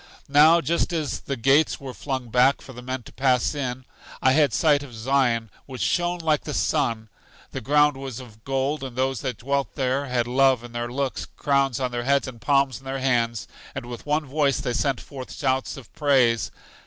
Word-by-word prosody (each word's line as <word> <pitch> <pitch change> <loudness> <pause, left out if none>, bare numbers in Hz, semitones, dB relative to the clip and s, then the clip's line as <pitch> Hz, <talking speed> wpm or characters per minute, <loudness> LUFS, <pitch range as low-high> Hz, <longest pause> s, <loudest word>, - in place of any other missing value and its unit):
Now, 155 +4 +6
just 170 +5 0
as 155 -6 -2
the 140 - -4
gates 135 +6 +3
were 135 -2 -7
flung 130 -3 -4
back 125 +4 +4
for 130 - -11
the 125 - -9
men 130 0 -5
to - - -14
pass 130 -1 +2
in, 130 -3 -4 0.3
I 130 - +4
had 145 +1 +4
a 110 - -4
sight 145 +4 +3
of 135 -5 -10
Zion, 115 -2 +1 0.2
which 130 -2 -4
shone 175 0 +1
like 160 -3 +1
the 150 - -4
sun; 115 -7 0 0.4
the - - -5
ground 145 +2 +3
was 135 -3 -6
of 110 -4 -13
gold, 135 +2 -1
and 130 -3 -6
those 130 -2 0
who 130 - -1
dwelt 140 0 -2
there 135 +1 0
had 125 -2 0
love 130 0 +3
in 120 - -10
their 120 0 -4
looks, 135 0 -2
crowns 140 -3 +1
on 130 -2 -1
their 120 0 -3
heads, 140 0 +2
and 120 -3 -9
palms 140 -3 +2
in 135 - -20
their 135 0 -3
hands, 120 -4 0 0.3
and 130 -2 -5
with 120 +3 -9
one 150 +1 +1
voice 140 0 +1
they 125 - -2
sent 135 +1 0
forth 130 -2 -9
shouts 130 -1 -1
of 130 -5 -13
praise. 130 -6 +2
135 Hz, 210 wpm, -24 LUFS, 125-140 Hz, 0.4 s, Now